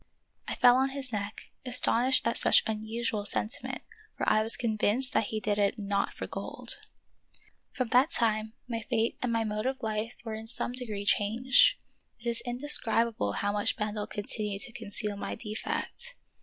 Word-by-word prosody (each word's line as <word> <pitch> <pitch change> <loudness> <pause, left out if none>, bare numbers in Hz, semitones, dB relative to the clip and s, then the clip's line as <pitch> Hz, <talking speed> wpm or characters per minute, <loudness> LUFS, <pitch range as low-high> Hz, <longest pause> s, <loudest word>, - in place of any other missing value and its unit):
I - - -2
fell 245 0 +6
on 265 +1 +2
his 265 -3 -5
neck, 205 0 -5
astonished 250 0 +2
at 230 - +1
such - - +5
unusual 220 0 -2
sentiment, 215 +3 -2 0.3
for - - -2
I 215 - +4
was 225 +1 +6
convinced 230 +2 +1
that - - +2
he 215 +1 -3
did 210 -1 -1
it 200 +3 +2
not 200 -1 -1
for - - -5
gold. - - -5 0.9
From 255 -4 -2
that 255 +6 +4
time 220 -6 +1
my 230 -2 -3
fate 225 0 -1
and 250 - -1
my 230 -1 +1
mode 215 +2 -2
of 265 -1 -3
life 220 +1 -2
were 225 - -4
in 220 +1 -7
some 240 - -1
degree 220 -5 -5
changed. 245 - +4 0.4
It 240 - -8
is 235 -1 0
indescribable 235 - +4
how 205 - -1
much 205 0 0
Bendel 210 0 -3
continued 205 -1 -2
to 245 - -6
conceal 210 -1 -4
my - - -4
defect. 355 - -5
225 Hz, 170 wpm, -29 LUFS, 210-245 Hz, 0.9 s, fell